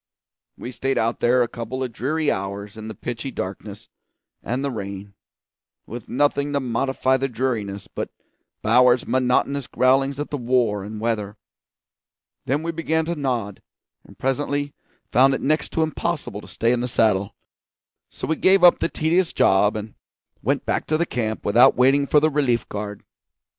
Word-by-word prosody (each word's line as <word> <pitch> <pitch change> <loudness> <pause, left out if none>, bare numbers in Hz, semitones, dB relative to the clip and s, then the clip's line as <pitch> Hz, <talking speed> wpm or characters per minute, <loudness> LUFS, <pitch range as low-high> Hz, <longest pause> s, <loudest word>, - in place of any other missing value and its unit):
We 125 - -7
stayed 135 +2 -2
out 115 +1 0
there 125 +1 +3
a - - -2
couple 120 +3 -5
of 125 - -4
dreary 150 +6 0
hours 100 +2 -5
in 110 0 -8
the 110 - -7
pitchy 120 +2 -5
darkness 100 -1 -7 0.5
and 130 +4 -2
the 140 - -1
rain, 100 -2 -7 0.7
with 120 0 -9
nothing 145 +1 +1
to 140 - +2
modify 130 +1 0
the 135 +1 -1
dreariness 110 -6 -3
but - - -5 0.5
Bowers's 125 +2 +4
monotonous 130 +2 +1
growlings 135 +2 +2
at 145 - -4
the 145 - -1
war 120 -5 +1
and 105 +2 -7
the - - -8
weather; 105 -3 -2 1.1
then 145 +5 0
we 170 - -2
began 160 -1 -1
to 170 +1 -2
nod, 120 - -3 0.4
and - - -17
presently 145 +2 -1 0.4
found 135 +2 +5
it - - -5
next 155 +3 +1
to 160 - +2
impossible 155 -9 -3
to - - -13
stay 115 +1 0
in 125 - +1
the 125 - -1
saddle; 105 -5 +1 0.7
so - - -6
we 160 - 0
gave 190 0 +4
up 175 - +7
the - - 0
tedious 170 +3 +1
job, 100 +2 +3
and 110 0 -6 0.5
went - - -1
back - - -1
to 155 - +1
the 170 - +1
camp 110 -7 -3
without 115 +5 +5
waiting 135 +3 +3
for 150 - +5
the 155 +1 +2
relief 135 -5 +1
guard. 105 0 -6
125 Hz, 175 wpm, -22 LUFS, 110-140 Hz, 1.1 s, up